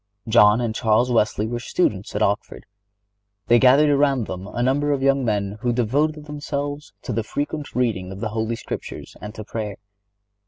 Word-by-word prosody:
John 110 0 +5
and 115 -2 -1
Charles 115 +2 +2
Wesley 105 -2 +2
were 120 +2 -3
students 105 - -1
at 105 - +1
Oxford. 100 0 -2 0.8
They 120 0 +5
gathered 140 +4 +6
around 140 -4 +2
them 95 0 -6
a 120 +3 -3
number 145 +3 +1
of 140 -2 0
young 135 0 +3
men 105 -2 -1
who 120 -1 +1
devoted 145 +6 0
themselves 145 0 -4
to - - -4
the 115 - 0
frequent 145 +6 -4
reading 110 -7 0
of 95 - -8
the 110 0 -2
Holy 110 +1 -2
Scriptures - - -7
and 105 +2 -8
to 110 - -6
prayer. 105 -2 -5
120 Hz, 180 wpm, -22 LUFS, 105-140 Hz, 0.8 s, gathered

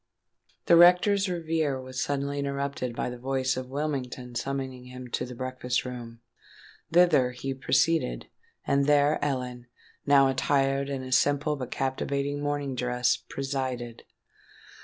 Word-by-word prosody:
The 170 - +6
rector's 185 +3 +6
reverie 160 -5 -1
was 130 0 -5
suddenly 140 0 -1
interrupted 140 -3 -3
by 125 - -2
the 125 - -8
voice 130 +1 0
of 130 0 -5
Whittingham 130 -3 -4
summoning 130 +1 -4
him 125 0 -9
to 120 - -2
the 125 - -8
breakfast 130 0 -2
room. 120 -2 -8 0.7
Thither 165 -8 +4
he 135 +2 -4
proceeded; 135 - +1 0.4
and 140 0 +2
there 145 0 +3
Ellen, 125 -3 -3 0.4
now 140 -1 +6
attired 135 +1 +1
in 135 -2 -3
a 130 - -7
simple 145 +3 +2
but 130 -4 -6
captivating 140 +2 -2
morning 145 -2 -2
dress, 125 0 +1
presided. 130 -4 -4
135 Hz, 135 wpm, -27 LUFS, 125-145 Hz, 0.7 s, The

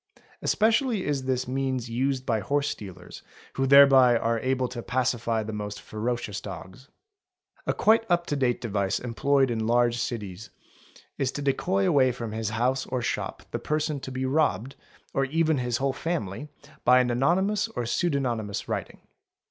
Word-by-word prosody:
Especially 225 0 +2
is 140 -3 -1
this 130 -1 -1
means 130 -2 -2
used 130 +3 -1
by 115 -3 +1
horse 145 +7 0
stealers, 90 -4 -9 0.3
who 135 0 0
thereby 135 -3 +7
are 115 0 0
able 130 +1 0
to 120 -1 -6
pacify 120 -3 0
the 110 +1 -6
most 105 -1 -5
ee - - -11
ferocious 110 -2 -3
dogs. 95 +6 -9 0.4
| 370 0 -35
A - - +2
quite 225 0 +3
up 175 0 +2
to 145 - -2
date 130 -3 +1
device 100 -4 -1
employed 135 +2 +1
in 110 -1 -1
large 120 0 +2
cities 105 -4 -5 0.7
is 135 - +1
fo 145 - -5
decoy 100 -8 +1
away 130 +3 +4
from 115 -2 -6
his 110 -1 -2
house 125 +4 0
or 125 -1 -2
shop - - -3
the - - -2
person 155 -1 -1
to 130 - -7
be 130 0 -2
robbed, 135 -4 0 0.4
or 135 - +1
even 160 +1 +1
his 125 -1 -1
whole 135 +1 0
family, 145 - -3 0.4
by 125 +1 +6
an 125 -1 +1
anonymous 185 - +1
or 120 - -4
pseudonymous 120 - -1
writing. - - -4
130 Hz, 170 wpm, -26 LUFS, 115-140 Hz, 0.7 s, thereby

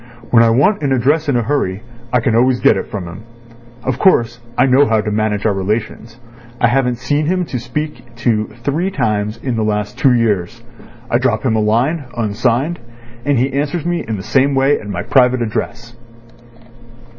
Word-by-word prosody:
When 115 - +6
I 115 - +4
want 145 - +2
an 140 -2 -1
address 145 +5 +1
in 140 - +2
a 120 - 0
hurry, 105 -6 -1 0.3
I 125 - +2
can 115 0 0
always 125 +1 +3
get - - +4
it - - -4
from 95 -4 -5
him. 90 +5 -10 0.6
Of 130 -1 -2
course, 120 -10 +3 0.2
I - - +5
know 135 +2 +4
how 110 -1 +2
to 105 0 -2
manage 105 -1 -1
our 105 - +3
relations. 110 +4 -3 0.4
I 120 - +3
haven't 125 -1 +1
seen 145 +5 -1
him 180 +1 0
to 125 - -4
speak 120 -1 -6
to 115 -2 0 0.2
three 160 +9 0
times 105 - -1
in 120 +1 -3
the 110 - 0
last 105 +3 -2
two 130 -2 +4
years. 115 -2 0 0.5
I 120 - +3
drop 120 -4 0
him 120 -4 +1
a 110 - +1
line, 125 +9 +1
unsigned, 120 +8 0 0.5
and 145 -2 +2
he 130 +2 0
answers 145 +3 -2
me 175 0 -1
in 110 -2 -2
the 95 - -7
same 135 +5 +2
way 135 +2 +3
at 105 - -10
my 90 -3 -3
private 125 -2 +3
address." 115 +1 -5
120 Hz, 195 wpm, -17 LUFS, 110-135 Hz, 0.6 s, When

